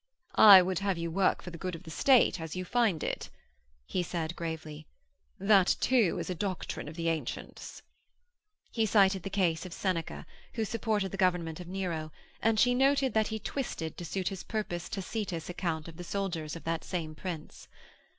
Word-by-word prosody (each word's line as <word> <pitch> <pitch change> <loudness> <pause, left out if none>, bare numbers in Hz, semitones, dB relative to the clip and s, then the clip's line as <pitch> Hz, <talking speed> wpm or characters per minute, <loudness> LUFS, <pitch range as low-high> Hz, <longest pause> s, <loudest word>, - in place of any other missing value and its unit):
'I 195 -4 +10
would 185 -1 -1
have 195 -2 0
you 170 0 -3
work 190 +2 +2
for 175 - -7
the 170 - -9
good 185 -2 -3
of 165 - -11
the 160 - -10
State 250 - +4
as 160 0 -5
you 185 0 -3
find 220 -7 +1
it,' - - -3 0.6
he 185 - -1
said 170 -1 -3
gravely. 155 -2 -6 0.5
'That, 195 -1 +4
too, 235 -9 +3
is - - -4
a 185 - -2
doctrine 185 -3 -4
of 155 - -8
the 165 0 -2
Ancients.' 165 -2 -4 0.9
He 225 -2 +1
cited 195 -2 +4
the 195 - -5
case 180 -5 +1
of 185 -2 -8
Seneca, 180 -4 -2 0.3
who 225 -2 0
supported 215 -3 -1
the 195 - -5
government 180 -4 +1
of 180 - -8
Nero, 175 -4 -3 0.3
and 225 -1 +2
she 245 +2 +5
noted 270 +1 +3
that 220 -1 +2
he 220 - -3
twisted 215 - -4
to - - -7
suit 185 +2 -2
his 190 -2 -6
purpose 205 -6 -4
Tacitus' 190 -4 -4
account 170 -3 -3
of 165 -1 -10
the 175 - -6
soldiers 175 -5 -3
of 165 - -9
that 165 0 -2
same 160 -4 -4
Prince. 160 -1 -7
185 Hz, 190 wpm, -30 LUFS, 165-200 Hz, 0.9 s, I